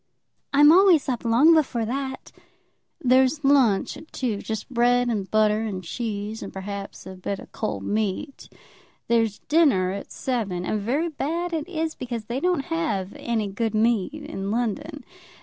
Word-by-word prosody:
"I'm 295 +2 +7
always 360 -3 +5
up 250 -4 -2
long 245 +8 +5
before 260 -8 +1
that." 265 +3 -4 0.7
"There's 260 +4 +3
lunch 265 -8 +3
at 315 - -13
two, 240 -6 -2
just 220 -1 -5
bread 245 -1 +2
and 205 -4 -2
butter 215 0 +3
and 200 -4 -4
cheese, 210 +2 -4
and 195 - -7
perhaps 200 +1 -7
a 190 - -8
bit 190 +2 -4
of - - -13
cold 100 -2 -3
meat. 215 - -3 0.6
There's 225 -3 +2
dinner 280 - +3
at 200 +1 -7
seven; 200 -9 -2
and 210 +2 -1
very 280 +11 0
bad 335 +4 -3
it 320 +1 -3
is, 320 -2 -2
because 235 -3 -5
they 240 +4 -3
don't 355 -3 0
have 205 - -1
any 225 -3 -2
good 220 +3 -2
meat 220 -1 +2
in 200 -10 -5
London. 235 +5 -2
235 Hz, 160 wpm, -24 LUFS, 205-280 Hz, 0.7 s, I'm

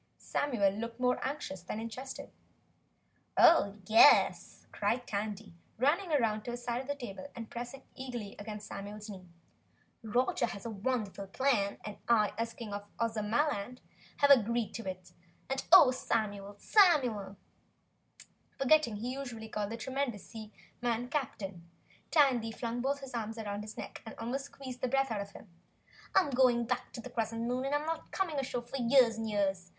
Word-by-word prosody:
Samuel 235 -9 +1
looked 230 +3 -5
more 250 0 +2
anxious 265 - -4
than 185 +4 -5
interested. 250 +4 -7 1.1
"Oh, 200 -12 +6
YES!" 225 +7 +5
cried 245 +1 0
Tandy, 205 -1 -4 0.2
running 300 - +2
round 225 -8 +1
to - - -4
his 240 0 -5
side 240 0 -1
of 265 - -11
the 285 - -1
table 235 -4 -7
and 230 -2 -8
pressing 245 +3 -6
eagerly 245 -6 -6
against 210 0 -7
Samuel's 205 +2 -7
knee. 185 -2 -10 0.7
"Roger 240 +2 +1
has 200 -1 -7
a 230 - -3
wonderful 210 -2 -2
plan 205 -2 +1
and 210 -1 -6
I 215 -3 +4
as 230 +1 -3
King 220 -4 -7
of 205 0 -5
Ozamaland 230 +2 0 0.4
have 285 -1 +5
agreed 235 -3 +4
to 225 -4 -4
it, 185 -1 -9 0.4
and 270 - -1
oh, 255 - +10
Samuel, 205 -5 -2
SAMUEL!" 245 - +3 1.2
Forgetting 270 -4 +4
he 240 +5 -3
usually 240 -5 -6
called 210 -1 -2
the 230 - -4
tremendous 260 -3 -3
seaman 230 +2 -5
"Captain," 195 - -4 0.4
Tandy 260 -7 +4
flung 235 +1 -3
both 280 +2 -1
arms 225 -1 -3
round 205 -2 -4
his 215 0 -9
neck - - -7
and 220 - -9
almost 255 +4 -3
squeezed 260 -3 -9
the 255 - +1
breath 270 0 +1
out 210 -2 -1
of 200 0 -8
him. - - -12 0.7
"I'm 325 -7 +4
going 245 -2 +4
straight - - -14
back 250 0 -1
on 235 - -7
the 255 - -8
Crescent 230 -1 -2
Moon, 250 +2 -1
and 280 +2 +1
I'm 295 +1 -1
not 325 0 -3
coming 335 -7 -1
ashore 250 -2 -3
for 240 +3 -6
years 240 -2 +4
and 225 -1 -2
years. 195 -3 0
230 Hz, 165 wpm, -32 LUFS, 210-260 Hz, 1.2 s, oh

